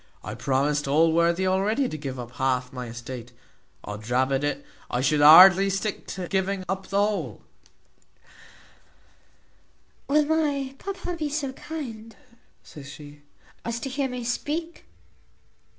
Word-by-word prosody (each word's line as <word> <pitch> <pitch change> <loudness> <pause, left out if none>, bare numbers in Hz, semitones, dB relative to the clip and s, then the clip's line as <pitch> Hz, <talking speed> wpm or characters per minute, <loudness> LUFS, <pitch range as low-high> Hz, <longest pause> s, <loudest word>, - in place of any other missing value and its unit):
I - - -6
promised 140 +2 0
Allworthy 165 +4 +3
already 205 +8 +1
to - - -6
give 135 -4 -6
up 120 -1 -7
half 125 -1 0
my 125 -1 -6
estate 120 +1 -8 0.5
od 105 +2 -8
rabbet 130 +2 +1
it! 145 - -2 0.2
I 125 - -1
should 145 +3 +2
hardly 185 +6 +9
stick 195 +1 -3
at 180 -2 -5
giving 190 0 -1
up 190 +1 -3
the 195 - -2
whole." 205 0 -1 2.6
"Will 300 +1 +3
my 290 -4 0
papa 380 -2 -5
be 310 -3 -3
so 285 -3 -3
kind," 230 -8 -8 0.5
says 140 -2 -11
she, 145 -1 -12 0.4
"as 235 0 -3
to 270 - -4
hear 270 0 -2
me 250 -1 -5
speak?" 310 +7 -3
190 Hz, 135 wpm, -25 LUFS, -, 2.6 s, hardly